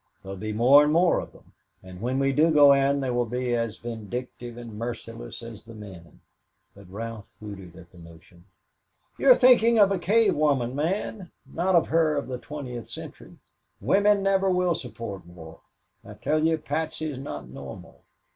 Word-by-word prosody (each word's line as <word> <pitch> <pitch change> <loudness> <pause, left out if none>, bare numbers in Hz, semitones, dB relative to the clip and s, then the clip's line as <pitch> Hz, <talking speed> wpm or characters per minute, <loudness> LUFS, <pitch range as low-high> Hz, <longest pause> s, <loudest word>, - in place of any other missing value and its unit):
There'll 95 0 -7
be 110 +3 -5
more 125 +7 +6
and 150 - +1
more 170 +2 +3
of - - -8
them, - - -21 0.3
and 95 0 -11
when 125 +3 -1
we 135 0 +2
do 155 +4 +4
go 145 -3 +7
in 140 0 +2
they 130 -2 -1
will 120 -1 0
be 125 +1 -1
as 115 -2 -2
vindictive 120 +1 -7
and 120 -2 -9
merciless 115 - -7
as 115 -3 -9
the 115 0 -13
men." 95 -6 -12 0.5
But 100 -2 -16
Ralph 110 +1 -7
hooted 95 -5 -10
at 85 0 -15
the 90 - -17
notion. 85 +1 -16 0.7
"You - - +3
are - - +10
thinking 235 -2 +5
of 200 -2 +5
a 195 - 0
cave 215 +5 +3
woman, 140 -5 +1
Man 185 +4 -3 0.2
not 180 +2 0
of 170 - +3
her 160 -2 +2
of 140 - -3
the 125 -1 -5
twentieth 125 -5 -7
century. - - -10 0.4
Women 200 - +3
never 195 0 +2
will 180 -1 +2
support 110 - -7
war. 80 -2 -13 0.4
I - - -11
tell 155 0 0
you, 165 0 +1
Patsy 155 +1 -4
is 130 - -7
not 135 - -7
normal. 65 +1 -11
125 Hz, 185 wpm, -25 LUFS, 105-160 Hz, 0.7 s, are